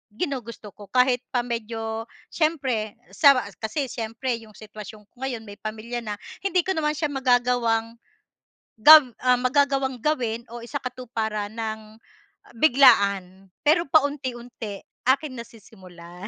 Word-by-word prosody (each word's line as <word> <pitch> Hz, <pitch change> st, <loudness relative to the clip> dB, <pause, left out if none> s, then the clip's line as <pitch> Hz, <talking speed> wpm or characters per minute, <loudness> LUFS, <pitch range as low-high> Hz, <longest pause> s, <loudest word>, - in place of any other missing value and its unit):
ginugusto 235 Hz, -, -5 dB
ko. 205 Hz, -1 st, -13 dB
Kahit 250 Hz, -1 st, +3 dB
pa 245 Hz, -, +2 dB
medyo 225 Hz, -1 st, -4 dB, 0.3 s
siyempre 265 Hz, -10 st, -1 dB, 0.2 s
sa 280 Hz, -4 st, +6 dB, 0.2 s
kasi 250 Hz, +6 st, -2 dB
siyempre, 230 Hz, +2 st, -3 dB
'yong 215 Hz, -2 st, -16 dB
sitwasyon 215 Hz, 0 st, -11 dB
ko -, -, -51 dB
ngayon, 240 Hz, -4 st, -4 dB
may 205 Hz, 0 st, -11 dB
pamilya 220 Hz, +3 st, -5 dB
na, 210 Hz, -1 st, -4 dB, 0.3 s
hindi 370 Hz, -2 st, +2 dB
ko 380 Hz, -, 0 dB
naman 300 Hz, -1 st, 0 dB
siya 305 Hz, -, 0 dB
magagawang 245 Hz, -4 st, +1 dB, 0.9 s
gab 305 Hz, 0 st, +10 dB, 0.2 s
ah, 250 Hz, -1 st, +4 dB
magagawang 270 Hz, 0 st, +1 dB
gawin 240 Hz, -7 st, -1 dB
o 240 Hz, -, -7 dB
isakatuparan 230 Hz, -5 st, -4 dB
nang, 220 Hz, -1 st, -6 dB, 0.5 s
ah, -, -, -19 dB
biglaan. 200 Hz, -9 st, +4 dB, 0.2 s
Pero 330 Hz, +3 st, +4 dB
paunti-unti, 250 Hz, -8 st, -1 dB, 0.2 s
aking 275 Hz, +2 st, +2 dB
nasisimulan. 185 Hz, -5 st, -12 dB
235 Hz, 125 wpm, -24 LUFS, 215-270 Hz, 0.9 s, gab